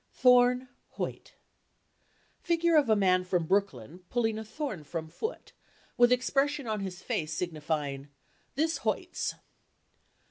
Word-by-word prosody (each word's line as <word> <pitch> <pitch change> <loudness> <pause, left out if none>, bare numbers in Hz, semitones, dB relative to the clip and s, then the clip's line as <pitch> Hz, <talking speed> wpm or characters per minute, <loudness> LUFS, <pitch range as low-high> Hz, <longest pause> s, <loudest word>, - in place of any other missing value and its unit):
"Thorne 250 0 +5 0.3
Hoyt—figure 340 -1 -4
of 290 -6 +4
a 220 - +6
man 185 -2 +3
from 180 -2 0
Brooklyn 175 - -1
pulling 225 -3 0
a - - -5
thorn 220 - -5
from 160 +2 -5
foot 445 - -5 0.4
with 240 0 +5
expression 275 +3 +1
on 215 -2 -2
his 190 -2 -6
face 155 0 -2
signifying 150 -5 -3 0.5
"This 320 +4 +1
hoits." - - -2
215 Hz, 115 wpm, -29 LUFS, 170-255 Hz, 0.5 s, a